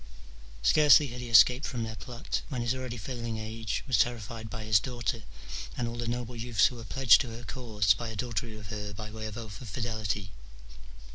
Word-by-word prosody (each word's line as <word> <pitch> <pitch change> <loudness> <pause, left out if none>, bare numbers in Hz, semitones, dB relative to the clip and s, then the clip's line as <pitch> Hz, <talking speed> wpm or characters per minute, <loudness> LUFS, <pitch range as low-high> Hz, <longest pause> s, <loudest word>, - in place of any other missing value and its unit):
Scarcely 150 - +6
had 125 +1 -7
he 120 - -6
escaped 125 +4 +6
from 120 -3 -3
their 110 0 -5
plot, 120 +1 -4
when 130 -5 -2
his 120 +1 +1
already 130 -2 -5
failing 115 0 -4
age 110 -1 -3
was 125 -7 +2
terrified 115 -1 -1
by 110 -1 -6
his 105 -1 +4
daughter 120 0 -3 0.6
and 120 - -1
all 115 - -5
the 120 -1 -3
noble 120 0 -3
youths 115 -1 +2
who 130 - +1
were 115 - -8
pledged 135 +1 +5
to 125 - -5
her 115 +1 -8
cause 105 -1 +1
by 120 - -5
adultery 110 0 -3
with 105 -2 -10
her 105 -2 -5
by 105 +2 -7
way 110 0 -5
of 110 0 -7
oath 110 -2 -8
of 120 - -8
fidelity. 105 -3 -3
115 Hz, 205 wpm, -29 LUFS, 110-120 Hz, 0.6 s, Scarcely